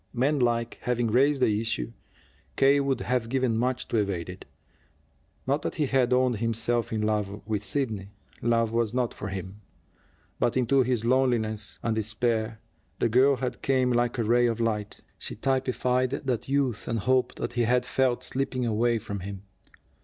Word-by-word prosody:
Manlike, 120 -3 +1
having 120 -2 0
raised 135 +3 +3
the 105 0 +2
issue, 110 - -3 0.6
K. 140 +1 +5
would 135 -3 0
have 125 -2 -1
given 130 -2 +1
much 125 +2 -1
to 115 - 0
evade 100 -5 -1
it. 90 +1 -9 1.0
Not 140 +3 +1
that - - -3
he 155 - +1
had 130 -2 +2
owned 125 -2 +3
himself 115 +1 -1
in 110 -1 -1
love 105 -2 -1
with 105 -2 -2
Sidney. 110 -5 -2 0.3
Love 115 -1 +2
was 115 0 0
not 125 -3 0
for 105 - -6
him. 95 +1 -6 0.8
But 120 - +1
into 130 +2 +3
his 125 -3 0
loneliness 115 -5 +1
and 115 - +1
despair 110 0 -1 0.4
the 115 - +1
girl 130 +4 +5
had 125 0 -4
came 130 -2 +2
like 120 +1 +1
a 115 - +1
ray 120 +2 +3
of 115 -1 -1
light. 105 -3 -2 0.2
She - - -3
typified 130 0 0
that 130 -3 -3
youth 135 -5 0
and 115 - -1
hope 130 +3 +1
that - - -4
he 120 - 0
had 125 +2 +2
felt 130 -2 +1
slipping 130 -2 -2
away 115 +1 +2
from 100 -2 -5
him. 95 +1 -7
120 Hz, 170 wpm, -27 LUFS, 110-130 Hz, 1.0 s, K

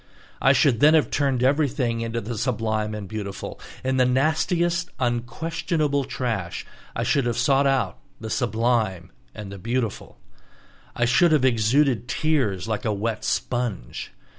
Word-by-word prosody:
I - - +6
should 120 -5 +3
then 150 +4 +6
have 155 - +2
turned 135 -4 +1
everything 130 -4 +1
into 115 0 -2
the 115 +3 -5
sublime 110 -2 -1
and 105 -2 -6
the - - -13
beautiful; 100 -2 -5 0.2
in 130 0 0
the 130 - +5
nastiest, 170 +6 +1
unquestionable 140 +4 -1
trash, 110 -10 -3 0.3
I - - -1
should 135 -4 +1
have 120 - -1
sought 140 -1 +3
out 135 -2 0 0.2
the 110 -1 -6
sublime 115 -7 0 0.2
and 105 -3 -7
the 100 - -8
beautiful. 115 +1 -3 0.8
I 120 - +2
should 145 +8 +4
have 150 -4 +4
exuded 120 +1 +2
tears 125 - 0
like 110 -2 -2
a 110 - 0
wet 105 +2 -2
sponge. 120 - -2
120 Hz, 150 wpm, -24 LUFS, 110-140 Hz, 0.8 s, I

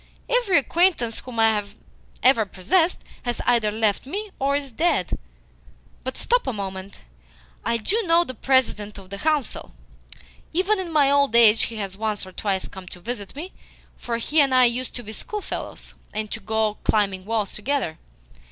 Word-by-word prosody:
Every 485 -7 +3
acquaintance 290 -6 +2
whom 245 -3 -7
I 220 -2 +4 0.6
ever 255 -3 +6
possessed 325 - +1 0.2
has 240 -1 -3
either 235 -3 +3
left 215 +2 0
me 405 +7 -4
or 275 +1 +1
is 280 -2 -2
dead. 235 - +1 0.9
But 260 - -4
stop - - +1
a 260 - 0
moment. 195 -1 -6 0.6
I 235 - +1
DO 405 - 0
know 335 +1 +5
the 260 - -6
President 225 -5 +1
of 195 -1 -13
the 200 - -5
Council. 300 -2 -1 0.8
Even 380 +4 +2
in 360 -3 -4
my 285 -3 +4
old 280 -4 +3
age 225 -2 +7
he 230 - -8
has 200 -3 -4
once 210 -1 -2
or 185 - -11
twice 195 0 -2
come 190 -2 -11
to 180 - -9
visit 210 +1 -5
me, 340 +6 -7 0.4
for 235 -1 -3
he 295 +6 +3
and 270 -2 +3
I 255 -1 +7
used 245 +1 0
to 245 - -5
be 215 0 -8
schoolfellows, 420 - -6 0.2
and 215 -1 -3
to 220 - -4
go 220 -1 -1
climbing 195 -3 +1
walls 215 -2 -1
together. 215 - -2
235 Hz, 170 wpm, -24 LUFS, 210-290 Hz, 0.9 s, age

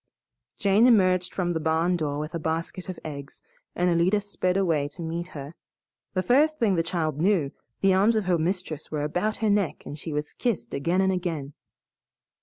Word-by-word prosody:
Jane 205 +4 +4
emerged 185 -6 +4
from 175 -2 -1
the 165 - -1
barn 160 +3 +1
door 150 -4 -2
with 150 +3 -4
a 170 - -2
basket 165 +3 -3
of 185 - -5
eggs, 140 -2 -8 0.3
and 180 - +1
Alida 175 +4 +3
sped 195 -2 -1
away 165 -7 +1
to 150 +4 -9
meet 170 +1 -3
her. 145 -3 -8 0.6
The 185 - +1
first 300 +7 +3
thing 220 -7 +2
the 170 - +2
child 160 -3 -2
knew 175 -7 +2 0.3
the 195 -1 +4
arms 205 +5 +4
of 215 -3 +1
her 180 -2 +2
mistress 165 -3 -2
were 150 -2 -2
about 180 +8 0
her - - +3
neck 200 -5 0
and 150 - -7
she 160 - -6
was 150 0 -3
kissed 205 - -2
again 170 +7 +1
and 190 0 +3
again. 165 -6 -3
175 Hz, 195 wpm, -26 LUFS, 155-190 Hz, 0.6 s, Jane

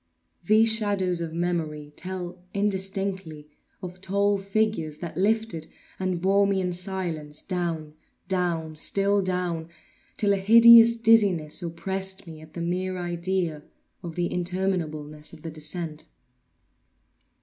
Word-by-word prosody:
These 220 +4 +5
shadows 200 -5 0
of 165 -1 -3
memory 160 -3 -3
tell, 180 -1 -6
indistinctly, 190 -5 -2 0.3
of 180 0 -8
tall 200 +1 +1
figures 195 -6 -1
that 170 0 -7
lifted 200 -4 0 0.3
and 185 -2 -1
bore 195 +2 +3
me 195 -1 +1
in 180 -1 -1
silence 175 -5 -3
down—down—still 175 +2 -1
down—till 180 +2 -3
a - - +1
hideous 230 +3 +8
dizziness 205 -9 +3
oppressed 190 +3 -3
me 160 -2 -10
at 155 0 -15
the 170 - -4
mere 185 +2 -2
idea 175 -2 -2 0.4
of 170 -2 -7
the 175 -1 0
interminableness 170 -5 -3
of 155 - -13
the 165 - -5
descent. 155 0 -4
180 Hz, 115 wpm, -26 LUFS, 165-195 Hz, 0.4 s, hideous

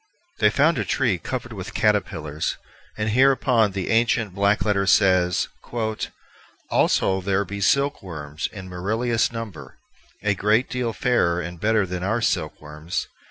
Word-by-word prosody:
They - - +5
found 155 +3 +2
a - - +1
tree 115 -10 0
covered - - -5
with - - -7
caterpillars, 75 -1 0 0.4
and 110 0 -1
hereupon 125 -4 +3
the 95 -2 -2
ancient 115 -3 +2
black 100 +2 +2
letter 100 -2 +1
says: 90 -3 +3 1.2
"Also 95 0 +2
there 100 +1 0
be 100 +1 -6
Silke 140 +7 +2
wormes 75 -3 -5
in 95 -3 -9
meruielous 110 +6 0
number, 115 -7 -8 0.5
a 100 -1 +2
great 105 +5 +1
deale 125 -2 -1
fairer 95 -6 +1
and 85 -1 -6
better 110 -1 +2
then 90 -1 -5
be 95 - -2
our 110 +3 +1
silk 115 - -1
wormes. 75 +3 -5
100 Hz, 150 wpm, -23 LUFS, 90-115 Hz, 1.2 s, They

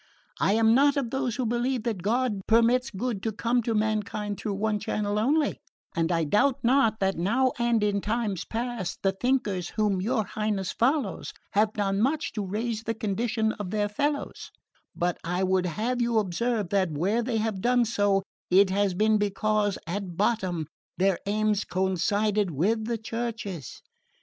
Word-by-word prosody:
I 195 - +3
am 225 0 +4
not 285 +3 +4
of 250 -5 -1
those 265 -4 -1
who 255 - -1
believe 240 +1 0
that 225 -6 -2
God 220 0 0
permits 235 +3 +4
good 220 0 -3
to 225 - -1
come 235 +3 0
to 230 0 -1
mankind 210 -1 -1
through 205 -3 -3
one 210 +1 0
channel 205 0 -1
only, 290 +6 +1 0.4
and 165 0 +1
I 165 -1 +2
doubt 210 - +2
not 235 -3 +3
that 190 -2 +1
now 245 +9 +2
and 235 -2 +2
in 200 -1 +1
times 215 -4 -1
past 230 -5 -3
the 195 - +3
thinkers 205 -5 -1
whom 205 -3 +1
your 220 +1 0
Highness 210 -3 -2
follows 275 +5 0 0.2
have 210 +1 +2
done 200 -1 0
much 290 +5 0
to 210 - -2
raise 215 +3 -2
the 225 0 -3
condition 220 +1 0
of 200 -3 -4
their 210 +1 0
fellows; 285 +8 -2 0.5
but 175 0 -1
I 180 +2 -1
would 185 -1 +2
have 235 +8 -1
you 235 -1 +1
observe 215 +1 0
that, 190 -2 +2
where 185 +10 0
they 235 -1 -1
have 215 -3 -1
done 245 +1 +3
so, 205 -3 +1 0.3
it 190 +1 +5
has 195 -1 +1
been 215 +2 +3
because, 205 0 0
at 180 0 -4
bottom, 185 -6 0 0.3
their 190 -1 +2
aims 210 0 +1
coincided 190 +3 0
with 205 +9 0
the 235 0 -1
Church's. 220 - -5
215 Hz, 170 wpm, -27 LUFS, 195-235 Hz, 0.5 s, it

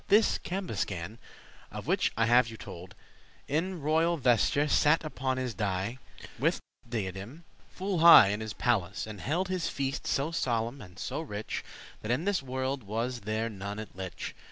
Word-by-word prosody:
This 210 +2 +4
Cambuscan, 110 - -3 0.5
of - - -7
which - - +2
I 115 - +4
have 120 +1 +5
you 110 - -9
told, 90 -2 -10 0.5
In 170 +5 -1
royal 160 +3 +2
vesture, 130 +3 +3
sat 150 +2 +4
upon 130 -3 -2
his 130 -2 -2
dais, 100 +4 -2 0.4
With - - +2 0.3
diadem, 105 - -5 0.3
full 190 -2 -2
high 165 -11 +10
in 105 +1 -1
his 110 -2 -4
palace; 100 -6 0
And 105 -3 -8
held 175 +7 0
his 185 -3 -1
feast 135 0 -3
so 140 +4 0
solemn 120 -4 -1
and 90 -3 -13
so 155 - -3
rich, 105 -9 -5 0.4
That 110 - -6
in 125 +8 +1
this 200 -5 +1
worlde 130 +1 -2
was 115 +4 -3
there 110 +2 -2
none 100 -1 -6
it 110 -4 -8
lich. 95 -1 -6
120 Hz, 165 wpm, -30 LUFS, 105-150 Hz, 0.5 s, high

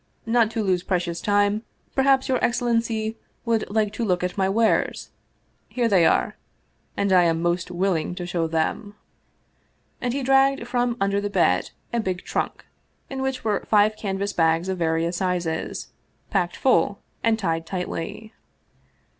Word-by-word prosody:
" - - -41
Not 225 -1 +3
to 225 -1 -2
lose 185 -3 +1
precious 175 -2 -2
time, 205 +1 +2 0.3
perhaps 270 0 +3
your 255 -2 0
excellency 230 -2 0 0.3
would 230 -2 0
like 210 0 0
to 235 - -3
look 180 -4 0
at 180 - -2
my 190 -1 +1
wares? 220 +3 +1 0.6
Here 245 -2 0
they 185 -6 +5
are - - +1 0.6
and 200 -1 +1
I 180 -1 +6
am 165 -1 +2
most 175 +1 0
willing 180 -2 -1
to 180 -1 -5
show 175 -2 -1
them." 165 +6 -2 1.1
And 245 - 0
he 275 +2 -2
dragged 270 +1 +3
from 245 -1 0
under 200 0 +1
the 205 - -2
bed 170 - +2 0.2
a 235 - +1
big 185 -4 -2
trunk, - - -3 0.5
in 265 -1 -3
which 265 -1 -2
were 210 -3 0
five 215 0 +4
canvas 200 -1 -3
bags 165 +2 +2
of 190 -1 -2
various 165 +1 0
sizes, 175 -3 -2 0.4
packed - - 0
full - - +2 0.3
and 225 -1 +3
tied 165 -6 -2
tightly. 185 +3 -5
200 Hz, 160 wpm, -24 LUFS, 175-230 Hz, 1.1 s, I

